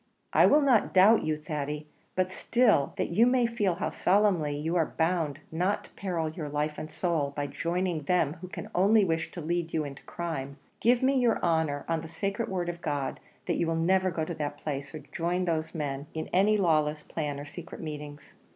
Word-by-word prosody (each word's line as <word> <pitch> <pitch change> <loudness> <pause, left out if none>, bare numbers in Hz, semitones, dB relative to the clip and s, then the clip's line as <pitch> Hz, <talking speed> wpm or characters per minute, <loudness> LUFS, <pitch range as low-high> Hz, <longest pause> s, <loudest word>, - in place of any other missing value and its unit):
"I - - +7
will 300 - +5
not 250 -8 +3
doubt 205 +5 +6
you, 155 -1 0
Thady; 150 -1 -4 0.3
but 185 0 +1
still, 215 - +2
that - - -1
you 225 +8 +5
may 250 -1 +3
feel 210 -6 0
how 180 - -2
solemnly 180 -7 +2
you 160 +4 -2
are 165 -3 0
bound 160 -3 +1
not 180 +5 0
to - - -14
peril 175 -5 -2
your 155 -1 -5
life 150 +1 -2
and 155 - -6
soul 155 -3 -1
by 145 - -1
joining 170 +3 -1
them 155 -1 +1
who 185 - -6
can - - -8
only 200 +3 +4
wish 165 -2 -1
to 175 - -7
lead 170 +1 -2
you 155 - +1
into 140 -1 -8
crime, 140 -5 -5 0.2
give 245 +2 +3
me 265 0 +3
your 240 -2 +3
honour, 160 -4 +1
on 165 -1 0
the 165 - -8
sacred 200 +6 -3
word 180 -2 -2
of 175 0 -4
God, 145 -3 -2 0.3
that - - 0
you 170 - +1
will 165 - 0
never 185 +3 +2
go 165 -3 -2
to 170 - -4
that 145 -2 -4
place; 140 -1 -5
or - - -5
join 175 +2 -1
those 160 -1 -2
men 145 -2 -3
in 160 - -4
any 205 +3 +4
lawless 155 -5 +2
plans 145 -3 -4
or 145 - -7
secret 160 +3 -9
meetings." 150 -2 -7
165 Hz, 210 wpm, -29 LUFS, 150-185 Hz, 0.3 s, I